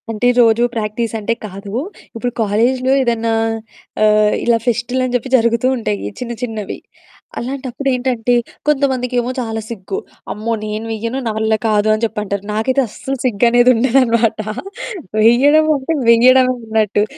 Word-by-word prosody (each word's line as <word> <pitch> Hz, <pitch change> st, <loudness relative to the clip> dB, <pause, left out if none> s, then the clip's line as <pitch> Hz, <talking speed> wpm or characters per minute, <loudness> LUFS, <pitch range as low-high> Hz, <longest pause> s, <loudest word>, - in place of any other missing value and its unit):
అంటే 225 Hz, +2 st, 0 dB
రోజు 230 Hz, 0 st, +4 dB
ప్రాక్టీస్ 220 Hz, +1 st, -2 dB
అంటే 215 Hz, +2 st, -1 dB
కాదు. 200 Hz, 0 st, -8 dB, 0.4 s
ఇప్పుడు 245 Hz, +2 st, -2 dB
కాలేజులో 240 Hz, +5 st, +1 dB
ఏదన్నా 230 Hz, -2 st, 0 dB, 0.7 s
ఆహ్, 210 Hz, 0 st, +4 dB
ఇలా 235 Hz, -1 st, +4 dB
ఫెస్టులని 245 Hz, +2 st, 0 dB
జెప్పి 245 Hz, +2 st, -2 dB
జరుగుతూ 235 Hz, +1 st, +1 dB
ఉంటాయి 100 Hz, -, -3 dB
చిన్న 240 Hz, -1 st, -4 dB
చిన్నవి. 220 Hz, -4 st, -4 dB, 0.6 s
అలాంటప్పుడేంటంటే 255 Hz, -2 st, -2 dB, 0.3 s
కొంతమందికేమో 255 Hz, -4 st, +1 dB
చాలా 225 Hz, -2 st, -3 dB
సిగ్గు. 225 Hz, -, -5 dB, 0.3 s
"అమ్మో! 220 Hz, +2 st, -3 dB
నేను 215 Hz, +1 st, -4 dB
వెయ్యను. 230 Hz, +4 st, -3 dB
నా -, -, 0 dB
వల్ల 220 Hz, 0 st, +1 dB
కాదు" 210 Hz, -1 st, +2 dB
అని 215 Hz, +2 st, -2 dB
జెప్పంటారు. 210 Hz, -3 st, -3 dB
నాకైతే 255 Hz, +6 st, +1 dB
అస్సలు 270 Hz, +5 st, -5 dB
సిగ్గనేది 240 Hz, +2 st, +4 dB
ఉండదనమాట. 235 Hz, -2 st, +2 dB, 0.8 s
వెయ్యడమంకటే 285 Hz, +6 st, +4 dB
వెయడమే 255 Hz, +2 st, +5 dB
ఉన్నట్టు. 215 Hz, -2 st, +1 dB
235 Hz, 120 wpm, -17 LUFS, 220-255 Hz, 0.8 s, వెయడమే